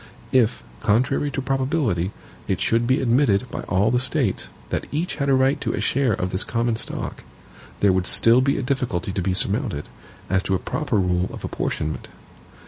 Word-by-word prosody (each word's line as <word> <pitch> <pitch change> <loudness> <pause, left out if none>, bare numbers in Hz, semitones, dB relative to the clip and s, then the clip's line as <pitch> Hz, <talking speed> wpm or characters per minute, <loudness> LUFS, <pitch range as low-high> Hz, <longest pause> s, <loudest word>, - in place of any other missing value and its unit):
If, 120 -3 +2 0.2
contrary 125 +7 +1
to 135 -2 -3
probability, 130 - 0 0.4
it 95 -2 0
should 115 +3 +1
be 130 +2 +2
admitted 120 -3 +3
by - - -4
all 100 +3 +2
the 125 - +3
States, 130 - 0 0.2
that - - -2
each 160 +5 -2
had 140 -2 0
a 135 - +5
right 130 +2 +2
to - - -1
a - - -2
share 130 -4 +1
of 90 -1 -2
this 95 - -1
common 115 0 0
stock, - - -4 0.6
there 100 -2 +5
would 95 0 0
still 115 +2 +6
be 140 +1 +1
a - - -2
difficulty 125 -9 -1
to 95 - -2
be 90 0 0
surmounted, 100 - 0 0.4
as 95 +1 +2
to 95 - 0
a - - +2
proper 150 - -2
rule 90 -2 +1
of - - -7
apportionment. 75 0 -3
115 Hz, 190 wpm, -23 LUFS, 95-135 Hz, 0.6 s, still